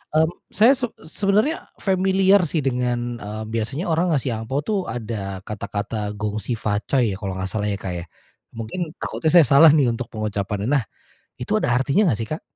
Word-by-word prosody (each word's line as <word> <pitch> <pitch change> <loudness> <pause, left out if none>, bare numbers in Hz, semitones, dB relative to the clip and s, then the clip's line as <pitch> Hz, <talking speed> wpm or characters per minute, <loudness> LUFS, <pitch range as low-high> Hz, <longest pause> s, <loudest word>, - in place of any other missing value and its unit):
mmm, 160 +1 +4 0.2
saya 220 +6 +5
seb 250 -4 -1 0.3
sebenarnya 210 +10 +1 0.2
familiar 190 +1 +4
sih, 150 -1 -1
dengan, 120 -2 -1
eee, 105 +1 -6
biasanya 115 - -2
orang 165 +3 +2
ngasih 135 -2 -1
angpao 125 +5 -2
tuh 210 +4 0
ada 105 -5 -5
kata-kata 105 0 -4
Gong 105 +1 -3
Xi 120 +2 -3
Fa 105 -1 +1
Cai 120 0 +1
ya, - - -3
kalau 95 -3 -4
nggak 95 0 -3
salah 105 0 -1
ya, 100 - 0
Kak, 95 - -3
ya. - - -6 0.5
Mungkin 115 +9 -5 0.2
takutnya 160 - -1
saya 170 -3 +8
salah 155 +4 +9
nih, 135 -6 +3
untuk 115 +1 -4
pengucapannya. 105 -1 -3
Nah, 135 - +2 0.5
itu - - -3
ada - - 0
artinya 140 +9 +2
nggak 115 - +1
sih, 110 - -4
Kak? 155 - -3
120 Hz, 190 wpm, -22 LUFS, 105-160 Hz, 0.5 s, salah